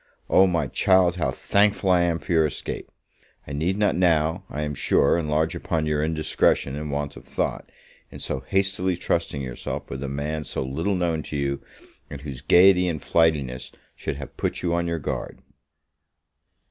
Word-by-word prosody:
O, 95 - +6
my 85 -4 +1
child, 90 +6 +3
how 85 - 0
thankful 100 -2 +2
am 85 -1 +3
I - - -4
for 70 - -8
your 80 -2 +4
escape! 75 - -5 0.6
I 70 - -6
need 85 +7 0
not 105 0 +2
now, 85 0 +2
I 75 - -3
am 75 -1 -3
sure, 70 - +3
enlarge 80 +1 0
upon 80 -2 -2
your 75 -1 0
indiscretion 80 -3 +1
and 75 0 -4
want 70 0 -3
of - - -11
thought, - - -3 0.4
in - - -10
so 65 - -3
hastily 95 +4 0
trusting 85 -5 -1
yourself 65 -2 -5
with 65 - -5
a 70 - -3
man 75 +3 -3
so 65 - -3
little 80 +10 -1
known 85 -3 0
to 75 - -5
you, 70 -1 -1 0.5
and 70 - -8
whose 70 -4 -7
gaiety 90 +4 +6
and 80 -3 -2
flightiness 70 -5 +1 0.2
should 80 - -4
have 70 -1 -9
put - - -2
you 85 -1 +1
on 85 0 0
your 85 0 -1
guard. 75 - -5
80 Hz, 180 wpm, -24 LUFS, 70-90 Hz, 0.6 s, O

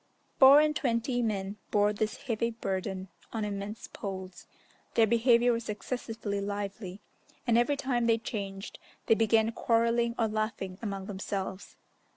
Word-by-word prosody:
Four 275 +2 +9
and 305 0 +2
twenty 245 -1 0
men 200 -3 -2
bore 205 0 +3
this 215 +1 -3
heavy 230 -2 0
burden 190 -4 -3 0.2
on 220 -2 -2
immense 205 +1 -5
poles: 190 -2 -7 0.5
their 225 - +6
behaviour 235 +2 +4
was 230 -1 -4
excessively 215 -1 -3
lively, 200 -1 -5 0.4
and 235 -2 +3
every 240 +5 +3
time 245 -4 0
they 230 -1 +4
changed, 200 -4 -6 0.3
they - - +5
began 225 0 +3
quarrelling 235 0 +1
or 225 - +2
laughing 215 -3 -3
among 195 -4 -4
themselves. 190 -1 -5
220 Hz, 140 wpm, -30 LUFS, 200-235 Hz, 0.5 s, Four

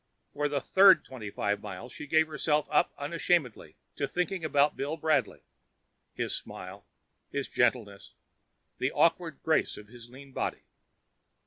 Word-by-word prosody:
For 145 0 -1
the 145 -1 0
third 190 +6 +6
twenty 115 -6 -8
five 100 0 -1
miles 105 +4 -8
she 150 - -8
gave 160 +2 +4
herself 150 -1 0
up 150 - +3
unashamedly 150 -3 -1 0.2
to - - -1
thinking 180 0 -2
about 145 -1 +2
Bill 145 +4 -3
Bradley: 155 0 0 0.7
his - - -2
smile, 95 +2 -9 0.4
his 140 -1 -3
gentleness, 115 -5 -1 0.6
the - - 0
awkward - - +1
grace - - +1
of 105 -1 -12
his 120 0 -13
lean 135 +2 -13
body. - - -3
140 Hz, 140 wpm, -29 LUFS, 115-155 Hz, 0.7 s, third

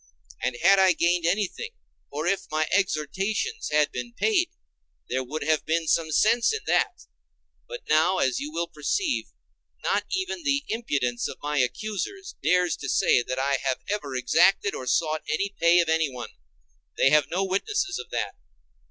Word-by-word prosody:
And 125 -1 -1
had 195 +2 +6
I 190 -1 +5
gained 170 0 +1
anything, 205 - -1 0.4
or 150 +2 -4
if 195 +3 -1
my 155 0 0
exhortations 195 - -1
had 150 -1 +2
been 120 -1 -6
paid, 370 -5 +2 0.6
there 130 +1 -1
would 150 +5 -5
have 155 0 +1
been 165 0 -1
some 160 +1 +2
sense 225 +10 +3
in 440 0 -3
that: - - +1 0.7
but - - -7
now, 160 +5 +3
as 130 -7 +1
you 150 +2 -5
will 170 +2 -1
perceive, 255 - -1 0.6
not - - 0
even 375 -2 -2
the 285 -2 0
impudence 140 - -1
of - - -8
my 150 0 0
accusers 215 - -3
dares 180 +1 +2
to 135 - -6
say 125 - +3
that 130 +2 -4
I 135 +1 +1
have 130 -2 -1
ever 145 -11 -3
exacted 180 +10 +3
or 130 - -6
sought 155 +3 +1 0.4
pay 170 +1 +5
of 170 - -2
anyone; 150 -7 -1 0.7
they 135 - +4
have 150 0 +4
no 185 +3 0
witness 385 - 0
of - - -8
that. - - -2
165 Hz, 165 wpm, -26 LUFS, 145-205 Hz, 0.7 s, had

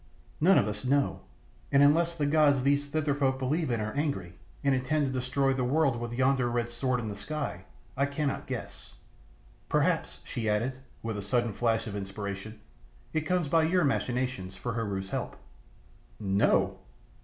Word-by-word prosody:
"None 185 +4 +6
of 100 - +3
us 105 0 -4
know, 140 +2 +1 0.5
and 140 0 +6
unless 165 +4 +4
the 150 -3 0
gods 145 -3 +4
these 145 +1 +2
Thither 145 0 0
folk 135 -2 +1
believe 150 +5 0
in 120 -2 0
are 110 0 -3
angry, 140 - -2 0.3
and 140 -1 +3
intend 135 +3 +1
to 135 - -1
destroy 130 +2 +1
the 130 -1 -1
world 135 -1 +2
with 120 0 -4
yonder 130 -1 +3
red 120 0 -1
sword 125 +1 0
in 115 - -4
the 105 - -4
sky, 100 - -4 0.3
I 140 +2 +2
cannot 140 0 -2
guess. - - -6 0.7
Perhaps," - - +1
she 110 -2 -3
added, 120 +5 0 0.2
with 110 -2 -3
a - - -3
sudden 115 +2 0
flash 115 +1 +1
of 105 - -5
inspiration, 100 +1 -5 0.5
"it 155 -1 -1
comes 180 -3 +1
by 165 +3 +4
your 175 +3 +3
machinations 125 -8 -1
for 125 +3 -4
Heru's 100 -4 -3
help." - - -3 0.8
"No!" 100 -1 +2
130 Hz, 170 wpm, -29 LUFS, 110-145 Hz, 0.8 s, None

